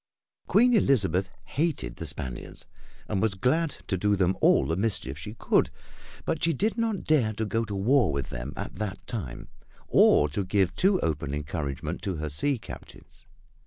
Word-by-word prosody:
Queen 245 Hz, +4 st, +5 dB
Elizabeth 100 Hz, -, +3 dB, 0.2 s
hated 150 Hz, -, -2 dB
the -, -, -4 dB
Spaniards 65 Hz, -2 st, -6 dB, 0.4 s
and 100 Hz, -3 st, -1 dB
was 110 Hz, -3 st, +1 dB
glad 145 Hz, -, +1 dB
to 95 Hz, -, -1 dB
do 105 Hz, +3 st, +2 dB
them 95 Hz, -1 st, +2 dB
all -, -, +5 dB
the 80 Hz, -, 0 dB
mischief 95 Hz, -, -1 dB
she 105 Hz, +10 st, -8 dB
could, -, -, +2 dB, 0.6 s
but -, -, -1 dB
she 165 Hz, 0 st, +3 dB
did 215 Hz, +6 st, 0 dB
not 225 Hz, -4 st, -1 dB
dare 130 Hz, -9 st, +2 dB
to 110 Hz, +1 st, -2 dB
go 115 Hz, +2 st, 0 dB
to 105 Hz, -2 st, -5 dB
war 120 Hz, +4 st, +3 dB
with 70 Hz, -2 st, -3 dB
them 60 Hz, +3 st, -5 dB
at -, -, -6 dB
that 100 Hz, -2 st, -4 dB
time 70 Hz, -, -5 dB, 0.4 s
or 75 Hz, -, +5 dB
to 75 Hz, +8 st, -2 dB
give 95 Hz, -1 st, +1 dB
too 190 Hz, 0 st, +3 dB
open 75 Hz, -2 st, -1 dB
encouragement 70 Hz, -2 st, -4 dB
to 95 Hz, -, -2 dB
her 75 Hz, -1 st, -3 dB
sea 135 Hz, -, 0 dB
captains. 110 Hz, -, -12 dB
100 Hz, 175 wpm, -27 LUFS, -, 0.6 s, Queen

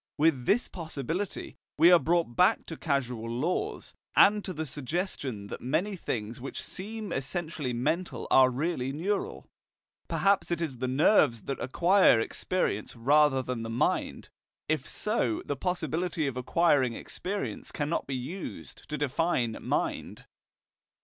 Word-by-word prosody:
With 145 Hz, -5 st, +2 dB
this 240 Hz, +4 st, +3 dB
possibility, 165 Hz, +3 st, -4 dB, 0.2 s
we 165 Hz, +4 st, +7 dB
are 175 Hz, -, +8 dB
brought 165 Hz, -8 st, +1 dB
back 180 Hz, -, +4 dB
to 165 Hz, -, -6 dB
causal 125 Hz, -7 st, -2 dB
laws, 140 Hz, +10 st, -2 dB, 0.2 s
and 205 Hz, +1 st, +6 dB
to 190 Hz, -, -5 dB
the 160 Hz, -2 st, -3 dB
suggestion 145 Hz, -, -4 dB
that -, -, -6 dB
many 165 Hz, +11 st, 0 dB
things 115 Hz, -, -4 dB
which 135 Hz, -, -5 dB
seem 215 Hz, +2 st, -6 dB
essentially 145 Hz, 0 st, -3 dB
mental 155 Hz, +9 st, -1 dB
are 130 Hz, -1 st, +7 dB
really 135 Hz, 0 st, -1 dB
neural. 190 Hz, +8 st, -2 dB, 0.6 s
Perhaps 200 Hz, 0 st, +2 dB
it 170 Hz, -1 st, 0 dB
is 145 Hz, -8 st, -3 dB
the 130 Hz, -, -1 dB
nerves 130 Hz, -, +4 dB
that 135 Hz, -, -4 dB
acquire 175 Hz, -, +4 dB
experience 115 Hz, -, -1 dB
rather 135 Hz, +2 st, +4 dB
than 125 Hz, -2 st, -3 dB
the 115 Hz, -, -5 dB
mind. 115 Hz, +2 st, -1 dB, 0.4 s
If 155 Hz, -4 st, -1 dB
so, 210 Hz, -, 0 dB
the 145 Hz, -, -2 dB
possibility 175 Hz, 0 st, -1 dB
of 135 Hz, -3 st, -2 dB
acquiring 130 Hz, -2 st, +2 dB
experience 195 Hz, -, -5 dB
cannot 150 Hz, +2 st, -2 dB
be 135 Hz, -, -2 dB
used 150 Hz, +10 st, -7 dB
to 150 Hz, -, -2 dB
define 145 Hz, -5 st, 0 dB
mind. -, -, -2 dB
150 Hz, 140 wpm, -29 LUFS, 125-175 Hz, 0.6 s, are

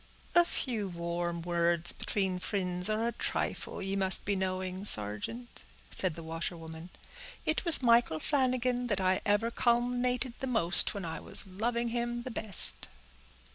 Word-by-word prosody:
"A 345 Hz, 0 st, +5 dB
few 230 Hz, -, -3 dB
warm 170 Hz, -1 st, -5 dB
words 170 Hz, -1 st, +1 dB
between 190 Hz, -3 st, -3 dB
fri'nds 180 Hz, -1 st, -3 dB
are 220 Hz, +2 st, -1 dB
a -, -, -2 dB
trifle, 230 Hz, -, -4 dB
ye 195 Hz, +1 st, -3 dB
must 190 Hz, -1 st, +2 dB
be 200 Hz, -, -1 dB
knowing, 185 Hz, 0 st, -4 dB
sargeant," 105 Hz, -, -1 dB, 0.3 s
said 185 Hz, -5 st, -2 dB
the 165 Hz, -, -9 dB
washerwoman. 165 Hz, 0 st, -7 dB, 0.6 s
"It 315 Hz, -, -1 dB
was 330 Hz, -5 st, +7 dB
Michael 235 Hz, -9 st, +2 dB
Flanagan 255 Hz, -, -1 dB
that 205 Hz, -5 st, -1 dB
I 185 Hz, 0 st, 0 dB
ever 205 Hz, +3 st, +1 dB
calumn'ated 245 Hz, +1 st, -1 dB
the 265 Hz, -, -4 dB
most 200 Hz, -6 st, +3 dB
when 200 Hz, -3 st, -6 dB
I 160 Hz, -, -5 dB
was -, -, +5 dB
loving 235 Hz, +5 st, -3 dB
him 240 Hz, 0 st, -4 dB
the 255 Hz, -, -7 dB
best." 215 Hz, -4 st, +5 dB
200 Hz, 150 wpm, -29 LUFS, 175-240 Hz, 0.6 s, was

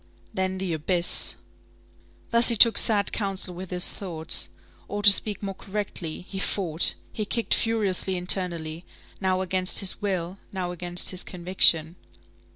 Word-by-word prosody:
Then 190 Hz, -1 st, -3 dB
the 185 Hz, -2 st, -4 dB
abyss. 170 Hz, +3 st, 0 dB, 1.0 s
Thus 235 Hz, 0 st, +3 dB
he 235 Hz, -, +5 dB
took 225 Hz, 0 st, +7 dB
sad 205 Hz, -3 st, +2 dB
council 195 Hz, -3 st, -3 dB
with 180 Hz, +1 st, -9 dB
his 180 Hz, 0 st, +2 dB
thoughts. 165 Hz, -5 st, -2 dB, 0.4 s
Or, 205 Hz, 0 st, -6 dB
to 205 Hz, -, +10 dB
speak 205 Hz, +1 st, 0 dB
more 195 Hz, -1 st, -4 dB
correctly, 190 Hz, -5 st, -7 dB
he 195 Hz, -, -7 dB
fought; 175 Hz, -5 st, +4 dB, 0.2 s
he 215 Hz, -, -4 dB
kicked 230 Hz, +2 st, -2 dB
furiously 200 Hz, -4 st, 0 dB
internally, 175 Hz, -3 st, 0 dB, 0.4 s
now 185 Hz, -1 st, -1 dB
against 185 Hz, 0 st, -1 dB
his 195 Hz, +2 st, +2 dB
will, 190 Hz, -2 st, -4 dB
now 185 Hz, -2 st, -5 dB
against 175 Hz, 0 st, -3 dB
his 185 Hz, -1 st, -6 dB
conviction. 175 Hz, -2 st, +1 dB
185 Hz, 145 wpm, -24 LUFS, 175-200 Hz, 1.0 s, to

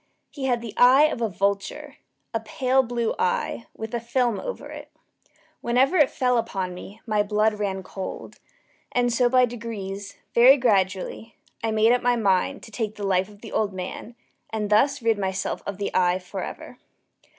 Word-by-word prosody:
He 275 Hz, -3 st, -5 dB
had 245 Hz, -3 st, +1 dB
the 230 Hz, -3 st, -7 dB
eye 255 Hz, +4 st, +7 dB
of 305 Hz, -6 st, +1 dB
a 225 Hz, -, +1 dB
vulture 200 Hz, +1 st, -2 dB, 0.4 s
a 225 Hz, -, 0 dB
pale 255 Hz, +4 st, +1 dB
blue 235 Hz, -2 st, -1 dB
eye, 465 Hz, -, -1 dB
with 220 Hz, +1 st, -6 dB
a 235 Hz, -, 0 dB
film 235 Hz, -1 st, 0 dB
over -, -, -6 dB
it. -, -, -9 dB, 0.7 s
Whenever 255 Hz, +8 st, +2 dB
it 295 Hz, -5 st, +5 dB
fell 250 Hz, -2 st, +1 dB
upon 185 Hz, -5 st, -3 dB
me, 195 Hz, +4 st, -10 dB
my 215 Hz, -2 st, +1 dB
blood 210 Hz, +1 st, +1 dB
ran 195 Hz, -2 st, -2 dB
cold; 190 Hz, 0 st, -7 dB, 0.5 s
and 245 Hz, -1 st, +1 dB
so 245 Hz, +1 st, +3 dB
by 255 Hz, 0 st, +5 dB
degrees 205 Hz, -4 st, -6 dB, 0.2 s
very 255 Hz, +4 st, +7 dB
gradually 200 Hz, -1 st, 0 dB, 0.3 s
I 225 Hz, -, +1 dB
made 220 Hz, +1 st, +4 dB
up 245 Hz, -, +3 dB
my 245 Hz, 0 st, +2 dB
mind 205 Hz, +4 st, +1 dB
to 225 Hz, -, -11 dB
take 215 Hz, 0 st, -3 dB
the 205 Hz, -, -5 dB
life 190 Hz, 0 st, +1 dB
of 205 Hz, 0 st, -17 dB
the 225 Hz, -, -9 dB
old 205 Hz, -2 st, 0 dB
man, 185 Hz, +5 st, -7 dB, 0.3 s
and 215 Hz, -1 st, -3 dB
thus 275 Hz, +5 st, +3 dB
rid 225 Hz, -2 st, +2 dB
myself 190 Hz, -1 st, -2 dB
of 200 Hz, -2 st, -4 dB
the 200 Hz, -, -3 dB
eye 180 Hz, 0 st, +3 dB
forever. 180 Hz, -1 st, -7 dB
225 Hz, 180 wpm, -24 LUFS, 200-245 Hz, 0.7 s, eye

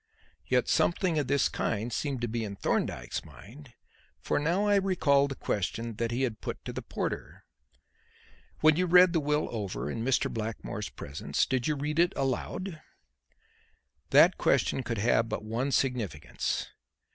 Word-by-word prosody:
Yet -, -, +2 dB
something 170 Hz, -2 st, +2 dB
of 145 Hz, -, -1 dB
this 140 Hz, -1 st, +3 dB
kind 110 Hz, +3 st, -2 dB
seemed 140 Hz, -3 st, -2 dB
to 120 Hz, -, 0 dB
be 115 Hz, 0 st, -2 dB
in 100 Hz, -2 st, -5 dB
Thorndyke's -, -, -2 dB
mind, 125 Hz, +5 st, -14 dB, 0.5 s
for -, -, 0 dB
now 170 Hz, +7 st, +1 dB
I 205 Hz, -1 st, +4 dB
recalled 150 Hz, -8 st, +3 dB
the 135 Hz, -, -4 dB
question 115 Hz, +2 st, -3 dB
that 115 Hz, 0 st, -1 dB
he 120 Hz, +3 st, -1 dB
had 115 Hz, -4 st, -2 dB
put -, -, -6 dB
to -, -, -5 dB
the -, -, -4 dB
porter: -, -, -5 dB, 1.2 s
"When 155 Hz, 0 st, +5 dB
you 180 Hz, 0 st, +2 dB
read 180 Hz, 0 st, +7 dB
the 165 Hz, -, +3 dB
will 150 Hz, 0 st, 0 dB
over 100 Hz, -10 st, -3 dB
in 115 Hz, -, -3 dB
Mr. 130 Hz, +1 st, +2 dB
Blackmore's 110 Hz, -1 st, -4 dB
presence, 70 Hz, 0 st, -2 dB
did 130 Hz, 0 st, -1 dB
you 150 Hz, -, +1 dB
read 150 Hz, +3 st, -2 dB
it 175 Hz, +1 st, +4 dB
aloud?" 155 Hz, +6 st, -3 dB, 1.3 s
That -, -, +6 dB
question -, -, +2 dB
could 115 Hz, -2 st, -3 dB
have 115 Hz, +1 st, +2 dB
but -, -, -3 dB
one 115 Hz, +6 st, -2 dB
significance. 115 Hz, -, -1 dB
130 Hz, 160 wpm, -29 LUFS, 115-155 Hz, 1.3 s, read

